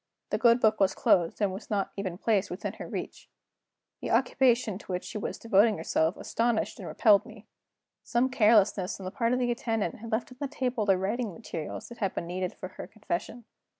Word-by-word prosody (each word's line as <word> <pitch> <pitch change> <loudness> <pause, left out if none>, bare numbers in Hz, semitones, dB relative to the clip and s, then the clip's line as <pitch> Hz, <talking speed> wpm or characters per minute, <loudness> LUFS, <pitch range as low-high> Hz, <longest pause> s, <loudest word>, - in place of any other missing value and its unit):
The - - 0
good 235 0 +5
book 215 -2 +3
was 195 -1 +3
closed 170 -2 +2
and 200 -2 +1
was 195 - -8
not 200 -2 -1
even 185 -3 -4
placed 205 -1 +1
within 180 - -4
her - - -6
reach. - - -6 0.7
The - - -4
occupation 250 -5 +2
to 195 - -9
which 180 0 -2
she 210 - -5
was - - -4
devoting 220 -1 +3
herself 160 +2 0
astonished 230 -1 -1
and - - -7
repelled 210 -4 +4
me. 225 -3 -13 0.6
Some 240 +2 +1
carelessness 210 -6 +3
on - - -8
the 185 - -4
part 230 +2 0
of 250 - +2
the 245 -1 +1
attendant 225 -6 -2
had 230 +2 -8
left 225 +3 -1
on 250 - -14
the 285 - -1
table 250 -5 -2
the 195 -1 +5
writing 210 +4 -2
materials 160 -2 -6
that 235 - -11
had 195 -4 -1
been - - -3
needed 180 +1 -3
for 185 - -7
her - - -9
confession. 215 +2 -5
215 Hz, 210 wpm, -28 LUFS, 190-235 Hz, 0.7 s, good